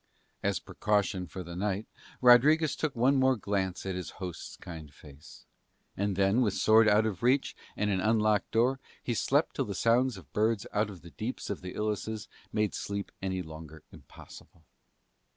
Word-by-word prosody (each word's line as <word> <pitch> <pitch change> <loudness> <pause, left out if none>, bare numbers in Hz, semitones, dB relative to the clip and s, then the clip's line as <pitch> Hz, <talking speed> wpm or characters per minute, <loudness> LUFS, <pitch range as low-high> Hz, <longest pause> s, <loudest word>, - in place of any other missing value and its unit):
As - - 0
precaution 100 -3 -1
for 90 +4 -7
the 85 0 -8
night 100 +3 -1 0.4
Rodriguez 145 +6 +6
took 155 -4 -2
one 130 +4 +3
more 130 0 +4
glance 95 -4 -2
at 95 - -2
his 90 -1 -5
host's 90 -3 -7
kind 80 -5 -9
face; 70 +1 -15 0.5
and 100 0 -1
then, 100 +5 +3
with 105 -6 +1
sword 110 0 +5
out 105 +1 +4
of 100 -6 -3
reach 130 +3 +2 0.2
and 105 -1 +1
an 95 -2 0
unlocked 110 -1 +2
door, 125 +4 +2 0.2
he 120 - -1
slept - - +1
till - - 0
the 100 - -5
songs 120 +2 +2
of 90 - -15
birds 110 0 +1
out 105 +1 +1
of 95 -5 -11
the 85 - -12
deeps 115 0 -5
of 100 - -4
the 90 0 -7
ilices 105 0 -3 0.2
made 105 -1 0
sleep 100 0 -4
any 95 -1 -2
longer 80 -1 -11
impossible. 80 - -15
105 Hz, 175 wpm, -30 LUFS, 95-115 Hz, 0.5 s, Rodriguez